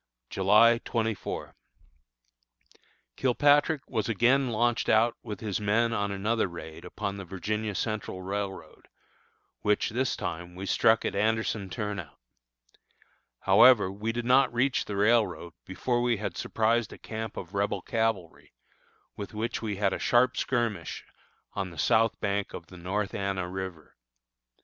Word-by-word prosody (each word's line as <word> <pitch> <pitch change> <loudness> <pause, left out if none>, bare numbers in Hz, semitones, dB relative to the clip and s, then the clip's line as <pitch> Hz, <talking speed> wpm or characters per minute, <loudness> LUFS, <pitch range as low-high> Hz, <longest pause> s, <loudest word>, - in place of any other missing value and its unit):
July 105 +5 +5
24. 110 -3 -3 1.6
Kilpatrick 145 +3 +3
was 110 -3 -2
again 125 +5 +3
launched 120 +1 +1
out 115 +2 +4
with 105 - -7
his 105 -2 -2
men 115 +3 +2
on 100 -2 -1
another 105 +3 0
raid 85 -2 -9
upon 100 +2 -5
the 100 - -6
Virginia 105 +3 -3
Central 105 -3 -3
Railroad, 100 0 -5 0.7
which, 105 0 +1
this 130 +3 0
time, 90 -1 -5
we 95 +2 -6
struck 110 +3 +3
at - - -1
Anderson 110 -1 0
Turnout. 105 - -5 1.2
However, 105 -7 +6
we 105 +3 -3
did 120 +1 -4
not 130 +1 +4
reach 125 +2 +1
the 105 - -5
railroad 105 -5 +2
before 120 +6 -1
we 120 -2 +1
had 105 - -4
surprised 115 0 0
a - - -10
camp 110 0 -6
of 90 +2 -7
Rebel 100 -1 -1
cavalry, 110 -7 -2 0.6
with 100 +1 -7
which 110 +2 -2
we 110 -3 -3
had 95 -1 +1
a - - -3
sharp 125 +1 +3
skirmish 115 -9 -2 0.5
on 95 -2 -3
the 85 - -13
south 110 +7 +2
bank 100 -1 -2
of 85 - -8
the 90 - -13
North 100 +4 -2
Anna 95 -2 -2
River. 95 -4 -7
105 Hz, 140 wpm, -28 LUFS, 95-115 Hz, 1.6 s, However